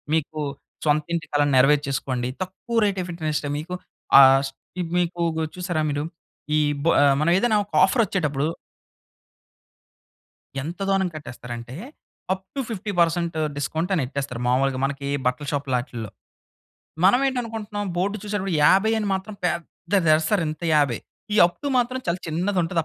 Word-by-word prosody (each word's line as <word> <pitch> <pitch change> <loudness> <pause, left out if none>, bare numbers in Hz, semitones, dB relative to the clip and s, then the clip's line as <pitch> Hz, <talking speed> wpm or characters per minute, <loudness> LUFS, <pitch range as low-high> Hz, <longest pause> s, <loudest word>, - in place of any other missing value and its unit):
మీకు 155 0 -2 0.5
సొంత 150 0 +3
ఇంటి 165 - -4
కలని 145 -1 +2
నెరవేర్చేసుకోండి, 135 -2 +2
తక్కువ 190 +5 -5
రేట్ 195 -2 0
ఆఫ్ 175 - -6
ఇంటర్నెస్ట్‌తో 155 -3 -2
మీకు 180 +4 -5 0.5
ఆహ్, 135 0 +7
స్ 135 - -9 0.3
ఈ - - +1 0.2
మీకు 175 0 -1 0.2
గు 160 - 0
చూశారా 175 -3 -1
మీరు? 145 +1 -1 0.5
ఈ - - +4 0.2
బ 165 - 0 0.3
మనం 160 +3 +2
ఏదైనా 220 0 +3
ఒక - - -35
ఆఫరొచ్చేటప్పుడు 180 - 0 2.2
ఎంత 170 +5 -6
దోనం 195 -1 +2
కట్టేస్తరంటే, 120 -3 -8 0.6
'అప్ 190 0 -8
టు - - -2
50% 175 -5 0 0.2
డిస్కౌంట్ 160 +6 -2
అని 165 - +1
ఎట్టేస్తారు, 135 -3 -4
మాములుగా 130 +1 +2
మనకి 140 0 -4 0.2
బట్టల 125 +3 0
షాప్ 140 -1 -2
లాటిల్లో. 120 -4 -4 1.0
మనం 245 +7 +6
ఏంటి 260 -2 -1
అనుకుంటున్నాం 210 -3 -5
బోర్డు 200 +4 0
చూసేటప్పుడు, 195 -4 -2
50 195 +7 +5
అని 210 - -2
మాత్రం 195 +2 -4
పెద్దది 170 0 0
ఏస్తరు 160 +4 +1
ఇంత 155 +2 -7
50. 140 -6 +2 0.3
ఈ 215 - +2
అప్ 175 - -12
టు - - -1
మాత్రం 255 +2 -1
చాలా 170 +1 0
చిన్నది 180 +4 0
ఉంటది, 165 0 0
165 Hz, 145 wpm, -24 LUFS, 140-195 Hz, 2.2 s, ఆహ్